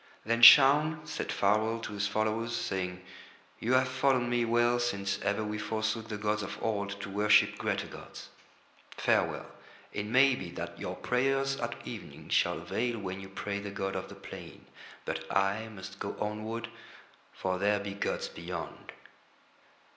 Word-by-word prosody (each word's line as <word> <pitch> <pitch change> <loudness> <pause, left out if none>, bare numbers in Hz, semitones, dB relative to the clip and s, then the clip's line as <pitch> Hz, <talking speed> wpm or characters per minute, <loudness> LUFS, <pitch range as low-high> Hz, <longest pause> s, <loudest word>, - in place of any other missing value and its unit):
Then 115 +1 +1
Shaun 150 +5 +8
said 155 - -4
farewell 110 +3 +2
to 110 - -6
his 100 -1 0
followers, 110 +3 -1
saying: 90 -3 -3 0.6
"You 120 +3 0
have 130 0 +4
followed 130 0 +2
me 120 0 +1
well 120 +1 +3
since 100 -5 -1
ever 100 +2 0
we 105 0 -3
forsook 110 +1 -2
the 105 - -4
gods 105 0 0
of 100 - -5
Old 100 -2 -2
to - - -6
worship 105 +1 +4
greater - - -1
gods. - - -11 0.7
Farewell. - - +1 0.5
It 105 0 -3
may 130 +4 +5
be 95 -8 -5
that 85 0 -6
your - - -4
prayers 135 +2 +1
at 120 -2 -3
evening - - -9
shall - - +2
avail 120 0 -2
when 95 -2 -5
you 95 0 -9
pray 100 +1 -4
to 100 - -7
the - - -3
god 95 -1 -3
of - - -4
the - - -10
plain, - - -10 0.4
but - - -4
I 100 +3 +1
must 100 -3 -10
go - - -4
onward, 110 +2 -3 0.6
for 95 -1 -2
there 100 +1 +2
be 100 0 -5
gods 100 - -2
beyond." 85 0 -7
110 Hz, 165 wpm, -30 LUFS, 100-120 Hz, 0.7 s, Shaun